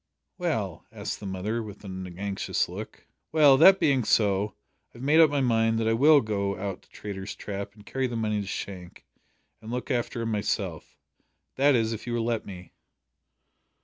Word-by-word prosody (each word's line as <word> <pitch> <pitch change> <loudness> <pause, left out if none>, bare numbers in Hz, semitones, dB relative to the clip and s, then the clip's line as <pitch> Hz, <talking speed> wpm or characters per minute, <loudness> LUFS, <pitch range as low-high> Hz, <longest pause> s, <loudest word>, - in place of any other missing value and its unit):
'" - - -55
"Well?" - - -2
asked - - -5
the 100 - -7
mother, 100 +5 -2
with 105 -2 -9
an 95 -2 -7
anxious 100 0 -1
look. - - -9 0.3
"Well 150 -3 +7
that 190 +6 +8
being 135 -4 +3
so, 105 -1 +2 0.4
I - - -11
have 120 - -9
made 150 +4 +4
up 160 -2 +8
my 145 -1 0
mind 115 -2 +2
that 115 0 0
I 115 - +3
will 145 +5 +6
go 100 -3 -2
out 95 0 -4
to - - -27
Traitor's 100 -1 -7
Trap 100 0 -6
and 105 -1 -17
carry 135 +3 -1
the 120 - -5
money 105 -2 0
to 100 - -7
Shank, 95 -3 -7 0.6
and 110 - -10
look 125 +4 -3
after 120 -1 -1
him 115 - -2
myself. 100 -5 -3 0.6
That 140 +1 +4
is, 115 -1 +1
if 110 - -8
you 120 - -2
will 115 -1 -1
let 115 -2 -2
me." 90 -2 -10
110 Hz, 195 wpm, -27 LUFS, 100-125 Hz, 0.6 s, that